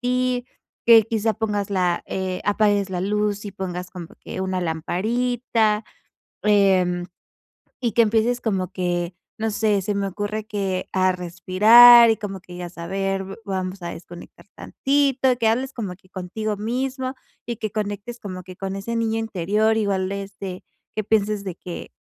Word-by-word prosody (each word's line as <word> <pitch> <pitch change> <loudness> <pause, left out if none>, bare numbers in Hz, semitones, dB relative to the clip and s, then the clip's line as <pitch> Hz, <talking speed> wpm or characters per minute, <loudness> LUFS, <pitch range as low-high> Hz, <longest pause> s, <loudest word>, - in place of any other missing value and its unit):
ti, 250 0 0 0.4
que 230 -1 +9
quizá 220 0 0
pongas 210 -3 -2
la, 180 -3 0
eh, 185 -1 -3
apagues 205 -1 +2
la 180 -1 -2
luz 210 +1 -1
y 205 - -5
pongas 180 -2 -5
como 180 -3 -8
que - - -6
una 185 -1 -1
lamparita. 220 +6 0 0.6
Em, 190 -4 +3 0.7
y 240 -3 -1
que 235 - +5
empieces 230 +2 +2
como 195 -5 -1
que, 175 -1 -1 0.2
no 220 0 -1
sé, 210 -1 +1
se 205 +2 -2
me 200 0 0
ocurre, 205 +2 -3
que 195 -4 -3
a 185 -1 +2
respirar 215 +7 +7
y 220 - +3
como 195 -3 -6
que, 180 - -17
y 180 0 -7
a 175 - -4
saber 195 +3 -3
v 195 +1 -8
vamos 190 -1 -3
a 170 0 -4
desconectar 175 0 -12
tantito, 270 -2 +1
que 230 -2 +1
hables 255 +4 +1
como 205 -6 -5
que 185 0 -26
contigo 205 +3 -4
mismo 255 +4 -2 0.3
y 235 - -3
que 215 -2 -4
conectes 210 +3 -4
como 185 -4 -7
que 185 0 -11
con 195 0 -4
ese 230 +4 -3
niño 225 0 0
interior, 215 +1 +1
igual, 195 -3 0
este, 195 -2 -6 0.3
que 215 - -1
pienses 210 -1 +1
de 185 - -4
que, 180 -1 -8
205 Hz, 165 wpm, -23 LUFS, 185-225 Hz, 0.7 s, que